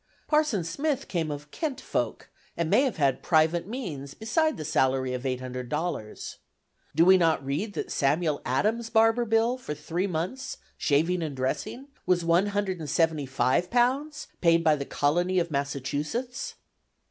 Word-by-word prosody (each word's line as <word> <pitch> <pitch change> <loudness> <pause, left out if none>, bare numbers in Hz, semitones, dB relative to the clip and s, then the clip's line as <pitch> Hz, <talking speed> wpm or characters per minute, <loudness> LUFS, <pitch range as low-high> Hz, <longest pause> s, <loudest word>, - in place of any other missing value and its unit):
Parson 300 - +2
Smith 280 - -2
came 165 -4 -1
of 150 0 -6
"kent 300 -5 -3
folk," - - -3 0.3
and 170 -1 -1
may 215 +6 +6
have 265 -7 0
had 140 -4 +2
private 165 +1 +2
means 170 - -6
beside 310 +8 +1
the 155 - -5
salary 130 -3 +1
of 125 +1 -3
eight 125 -1 -1
hundred 125 -1 -6
dollars. 150 -8 -4 0.6
Do 165 +2 +5
we 190 +1 +8
not 165 -5 +2
read 160 +10 -2
that - - -4
Samuel 150 +2 +1
Adams' 215 - 0
barber's 225 +1 +3
bill 225 +3 +2
"for 150 -11 -5
three 165 +6 -2
months, 185 +11 -3 0.2
shaving 165 +5 +1
and 155 -4 -3
dressing," 140 - -3 0.2
was 180 -1 +3
£175, 180 - +1
paid 165 -1 +4
by 155 -2 +5
the 140 -1 -4
Colony 175 +8 +1
of 170 -2 +1
Massachusetts? 145 - -3
170 Hz, 145 wpm, -27 LUFS, 145-225 Hz, 0.6 s, we